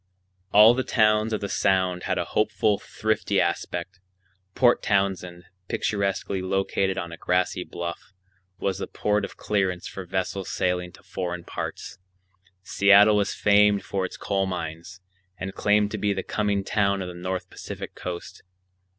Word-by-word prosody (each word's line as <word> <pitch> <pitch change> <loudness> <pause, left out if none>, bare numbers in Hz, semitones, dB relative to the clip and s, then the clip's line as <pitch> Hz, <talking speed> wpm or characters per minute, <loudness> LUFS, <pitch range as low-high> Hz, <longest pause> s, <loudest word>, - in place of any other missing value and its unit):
All 105 +3 +8
the 130 +1 -1
towns 110 -2 +3
of 110 - -1
the 100 - -2
Sound 95 -2 +1
had - - 0
a - - -1
hopeful, 105 -1 +2
thrifty 110 -2 -1
aspect. 90 +2 -2 0.6
Port 120 -1 +4
Townsend, 95 -3 0 0.2
picturesquely 100 -1 -1
located 95 0 0
on 85 -1 -4
a 85 - -8
grassy 90 +1 0
bluff, 85 +2 -6 0.5
was 95 -1 -2
the - - -4
port 105 0 0
of - - -6
clearance 95 -4 -1
for 95 - -7
vessels 95 +1 -3
sailing 90 -1 -1
to - - -17
foreign 90 -2 -4
parts. - - -6 0.6
Seattle 100 +2 +6
was 100 0 0
famed 105 0 +4
for 95 -1 -2
its 95 - -5
coal 95 -1 -1
mines, 85 0 -6 0.4
and 95 +1 -5
claimed 105 0 +2
to - - -3
be 105 -1 +1
the 95 -1 -3
coming 105 -2 0
town 100 -2 +1
of - - -6
the 90 - -7
North 90 +1 -4
Pacific - - -7
Coast. 90 -1 -7
95 Hz, 155 wpm, -25 LUFS, 90-105 Hz, 0.6 s, All